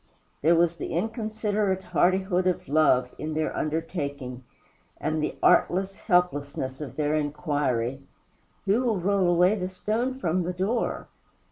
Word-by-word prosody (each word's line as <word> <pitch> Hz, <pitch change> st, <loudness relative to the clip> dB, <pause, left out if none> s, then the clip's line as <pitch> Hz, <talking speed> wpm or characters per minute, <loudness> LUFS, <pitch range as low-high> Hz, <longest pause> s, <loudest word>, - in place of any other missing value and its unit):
There 165 Hz, +4 st, +5 dB
was 170 Hz, 0 st, +2 dB
the -, -, -5 dB
inconsiderate 215 Hz, -1 st, -1 dB
hardihood 185 Hz, +1 st, +2 dB
of 180 Hz, -, -1 dB
love 135 Hz, -4 st, +3 dB
in 155 Hz, 0 st, -4 dB
their 155 Hz, 0 st, -1 dB
undertaking, 145 Hz, -5 st, -3 dB, 0.6 s
and 155 Hz, 0 st, -1 dB
the 150 Hz, -, -2 dB
artless 190 Hz, +2 st, +3 dB
helplessness 145 Hz, -6 st, 0 dB
of 140 Hz, -5 st, -6 dB
their 150 Hz, 0 st, 0 dB
inquiry, 145 Hz, -4 st, -1 dB, 0.6 s
"Who 205 Hz, +5 st, +3 dB
will 235 Hz, -5 st, +1 dB
roll 190 Hz, 0 st, +2 dB
away 180 Hz, +3 st, +4 dB
the 185 Hz, -4 st, -2 dB
stone 225 Hz, +7 st, -2 dB
from 180 Hz, -7 st, 0 dB
the 180 Hz, +1 st, -2 dB
door?" 200 Hz, +7 st, -1 dB
175 Hz, 135 wpm, -26 LUFS, 150-195 Hz, 0.6 s, There